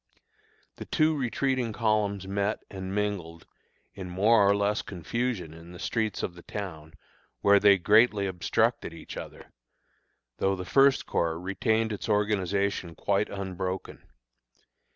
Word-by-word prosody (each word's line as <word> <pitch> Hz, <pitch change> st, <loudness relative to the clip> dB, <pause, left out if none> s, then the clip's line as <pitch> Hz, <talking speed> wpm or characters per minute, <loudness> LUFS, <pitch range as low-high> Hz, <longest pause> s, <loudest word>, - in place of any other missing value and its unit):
The -, -, -7 dB
two 155 Hz, 0 st, +2 dB
retreating 130 Hz, -3 st, -1 dB
columns 105 Hz, -4 st, 0 dB
met 100 Hz, +2 st, -1 dB
and 95 Hz, 0 st, -5 dB
mingled 95 Hz, -6 st, -3 dB, 0.5 s
in 95 Hz, -2 st, -7 dB
more 100 Hz, +5 st, +4 dB
or 100 Hz, -, +4 dB
less 100 Hz, +1 st, +1 dB
confusion 95 Hz, -1 st, -3 dB
in 85 Hz, +2 st, -12 dB
the -, -, -9 dB
streets 110 Hz, +1 st, -2 dB
of 90 Hz, -, -2 dB
the 85 Hz, -, -13 dB
town, 80 Hz, -6 st, -7 dB, 0.5 s
where 100 Hz, 0 st, +6 dB
they 100 Hz, -1 st, +6 dB
greatly 105 Hz, +2 st, +4 dB
obstructed 90 Hz, -2 st, 0 dB
each -, -, -10 dB
other, -, -, -9 dB, 0.9 s
though 95 Hz, 0 st, +2 dB
the 90 Hz, -1 st, -6 dB
First 135 Hz, +5 st, +4 dB
Corps 80 Hz, -1 st, -1 dB
retained 110 Hz, +4 st, 0 dB
its 105 Hz, -, -5 dB
organization 100 Hz, -4 st, 0 dB
quite 100 Hz, +4 st, 0 dB
unbroken. 95 Hz, -1 st, -5 dB
100 Hz, 130 wpm, -28 LUFS, 90-110 Hz, 0.9 s, where